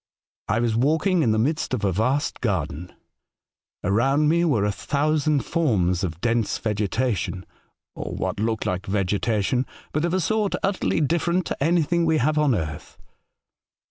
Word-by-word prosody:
I 110 +3 +1
was 115 -2 +1
walking 160 - +2
in 120 - +2
the 110 - +2
midst 140 +3 0
of 105 - -2
a 95 - +2
vast 130 - 0
garden. 90 - -2 0.9
Around 135 +9 +2
me 170 +2 +3
were 125 -12 +2
a 105 - +1
thousand 145 +8 0
forms 95 - +1
of 85 -3 -3
dense 115 -2 0
vegetation 105 -3 -1 0.2
— - - -54
or - - -5
what - - -3
looked 110 0 -1
like 90 +3 -2
vegetation 100 +5 0 0.2
— - - -26
but 155 - 0
of 170 +1 0
a - - +2
sort 215 +2 0
utterly 195 -4 0
different 170 +4 +1
to - - -3
anything 170 +1 +2
we 160 -1 +3
have 150 +3 +1
on 145 -5 +3
earth. 75 -6 -5
125 Hz, 165 wpm, -24 LUFS, 100-155 Hz, 0.9 s, me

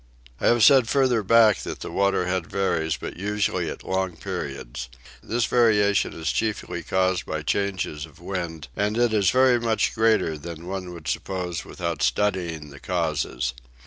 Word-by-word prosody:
I - - +1
have 120 -2 +4
said 130 -5 +6
further 130 -5 +3
back 110 0 +5
that - - -6
the - - -6
water 100 -2 +1
head 90 -1 -1
varies, 80 -6 0
but - - -7
usually 100 -3 -1
at - - -7
long 95 -2 -2
periods. - - -5 0.3
This 115 +1 0
variation 105 -4 +3
is 80 0 -2
chiefly 105 -5 -2
caused 95 +2 0
by 80 -1 -3
changes 90 -4 -2
of 75 - -20
wind, 85 -5 -5
and 105 +2 0
it 120 -2 +2
is 100 -4 +3
very 130 0 +4
much 115 -2 +1
greater 110 -9 +2
than 85 +2 -8
one 90 -1 -5
would 85 -3 -10
suppose 90 -3 -3
without 85 -4 -4
studying 85 -6 0
the 70 - -12
causes. 75 -8 -1
95 Hz, 165 wpm, -24 LUFS, 80-105 Hz, 0.3 s, said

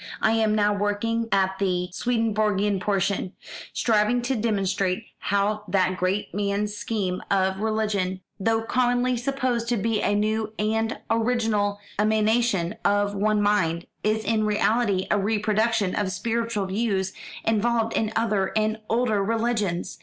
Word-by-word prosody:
I 220 - +3
am 220 -1 +2
now 210 -1 +3
working 205 +3 -1
at 190 -1 +1
the 180 -2 0
Swedenborgian 215 -3 0
portion, 195 -1 -1 0.4
striving 230 +2 +2
to 260 +2 0
demonstrate 200 -3 0 0.2
how 205 +2 0
that 185 -1 +1
great 185 +3 -1
man's 205 +1 -1
scheme 200 -4 -2
of 190 -1 +1
religion, 210 -4 -1 0.2
though 225 +2 +1
commonly 245 +1 +1
supposed 245 -2 -1
to 240 - +1
be 220 +1 0
a 205 - +1
new 215 +1 0
and 220 +1 0
original 225 -3 +1 0.2
emanation 215 -3 +2
of 205 0 +2
one 210 +1 +1
mind, 170 -5 +1 0.2
is 215 +1 +1
in 220 0 +1
reality 210 -2 +1
a 205 - +3
reproduction 215 0 +1
of 205 -2 -1
spiritual 230 +1 -1
views 190 -1 -1 0.3
involved 225 +1 +1
in 220 -1 0
other 210 -4 0
and 215 0 +1
older 220 -3 +1
religions. 215 -5 -1
210 Hz, 135 wpm, -25 LUFS, 200-225 Hz, 0.4 s, I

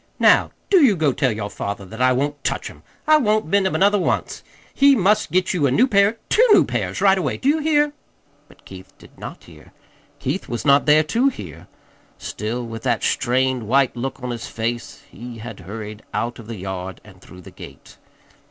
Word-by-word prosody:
Now, - - +4 0.2
do 375 -6 +6
you 225 -7 +5
go 155 -5 +1
tell 130 0 +1
your 105 -1 -5
father 100 -1 -5
that 110 +5 -8
I 130 0 +4
won't 145 +2 -2
touch - - -3
'em. - - -18 0.2
I 310 0 +6
won't 215 -6 +1
mend 190 +4 +2
'em - - -3
another 200 +2 +3
once. - - -2 0.3
He 280 0 +5
must 210 - +2
get 185 +2 +1
you 155 -6 +1
a - - 0
new 235 - +4
pair 205 -2 +2
two 460 - +4
new - - +6
pairs, - - -3
right 195 -1 +4
away. 155 -7 -2
Do 260 - -3
you 305 +3 +3
hear?" 295 -1 +1 0.5
But - - -22
Keith 95 -1 -13
did - - -18
not - - -9
hear. - - -17 0.4
Keith - - -4
was 120 - -4
not 140 +1 +4
there 150 +1 +5
to 230 - +1
hear. 90 - -10 0.5
Still 115 +4 -5
with 115 -1 -7
that - - -1
strained, 130 -2 0
white 130 +2 +2
look 130 +1 -5
on 125 - -3
his 120 -1 -6
face 115 +1 -5
he 120 0 -9
had 110 -2 -9
hurried 105 +3 -8
out 120 +1 -3
of 110 - -11
the 115 -2 -7
yard 95 0 -6
and 95 -3 -17
through 90 -1 -14
the - - -13
gate. - - -13
130 Hz, 210 wpm, -21 LUFS, -, 0.5 s, do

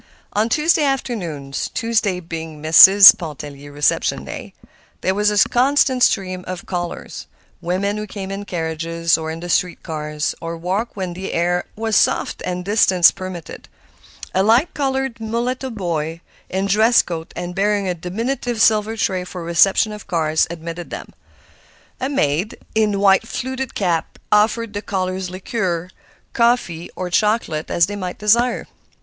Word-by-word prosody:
On 215 +3 +1
Tuesday 305 +4 +2
afternoons—Tuesday 210 - -2
being 165 -2 -7
Mrs. 190 +7 +9
Pontellier's 145 -5 -8
reception 145 -1 +1
day—there 190 - -7
was 210 +1 +2
a 210 -1 +3
constant 260 0 +2
stream 185 -5 +1
of 185 -1 -6
callers—women 180 +2 -5
who 210 0 -5
came 195 -1 -6
in 200 +1 -5
carriages 165 -1 -1
or 160 0 -4
in 160 +1 -6
the 175 - -6
street 175 0 0
cars, 150 -1 -3
or 165 0 -5
walked 190 +7 -3
when 185 -3 -4
the 190 +2 -6
air 175 +1 0
was 220 0 -1
soft - - +1
and 180 0 -3
distance 190 -4 +5
permitted. 185 -4 -8 0.6
A 190 - +2
light 230 - +3
colored 265 -3 -2
mulatto 240 +4 -2
boy, 170 -6 -3 0.3
in 190 +1 -1
dress 220 +4 +4
coat 165 -2 -6
and 175 0 -5
bearing 200 +1 0
a 180 - 0
diminutive 230 +7 -3
silver 220 0 +3
tray 185 -3 0
for 180 0 -8
the - - -7
reception 190 +5 +3
of 210 0 -9
cards, 160 -4 +1
admitted 170 +1 -7
them. - - -8 0.9
A 260 - -2
maid, 175 - 0 0.2
in 210 -2 +1
white 195 +2 +4
fluted 260 +1 -4
cap, 170 -5 -1
offered 220 +1 +2
the 205 - -3
callers 185 -2 -3
liqueur, 185 -2 -3 0.4
coffee, 235 -8 +1
or 180 -1 -5
chocolate, 210 -6 0
as 170 - +3
they 205 - -6
might 185 -3 -5
desire. 235 +4 +2
190 Hz, 145 wpm, -20 LUFS, 170-220 Hz, 0.9 s, Mrs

